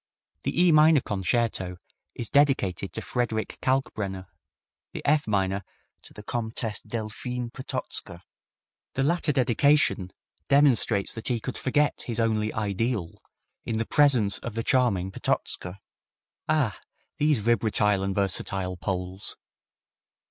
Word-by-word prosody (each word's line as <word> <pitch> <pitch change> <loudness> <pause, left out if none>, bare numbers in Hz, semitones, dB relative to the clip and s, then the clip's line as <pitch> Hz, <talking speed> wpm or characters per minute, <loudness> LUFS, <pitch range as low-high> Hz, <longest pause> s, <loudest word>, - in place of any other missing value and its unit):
The - - -1
E 180 - +6
minor 155 0 +6
Concerto 95 -2 -1 0.4
is 115 - -6
dedicated 100 - +2
to - - -4
Frederick 115 -3 -2
Kalkbrenner, 105 -8 -1 0.7
the - - -7
F 150 -1 +3
minor 100 -1 0 0.4
to - - -14
the 105 - -11
Comtesse 110 -1 -3
Deiphine 115 +3 -4
Potocka. 125 -9 -5 0.7
The 135 - +1
latter 165 +1 +2
dedication 135 -6 +3 0.4
demonstrates 125 -8 +3
that 110 - -6
he 120 -2 0
could 130 +3 -5
forget 145 +3 +1
his 120 -2 -2
only 110 -1 +1
"ideal" 105 -2 -2 0.4
in 110 - -2
the 115 - -1
presence 125 -7 +4
of 115 -2 -6
the 115 - -1
charming 100 -9 +2
Potocka! 90 0 -2 0.7
Ah! - - +1 0.4
these 150 -1 +3
vibratile 105 -2 +2
and 95 0 -2
versatile 95 -1 -1
Poles! 90 +1 -4
110 Hz, 120 wpm, -26 LUFS, 100-130 Hz, 0.7 s, E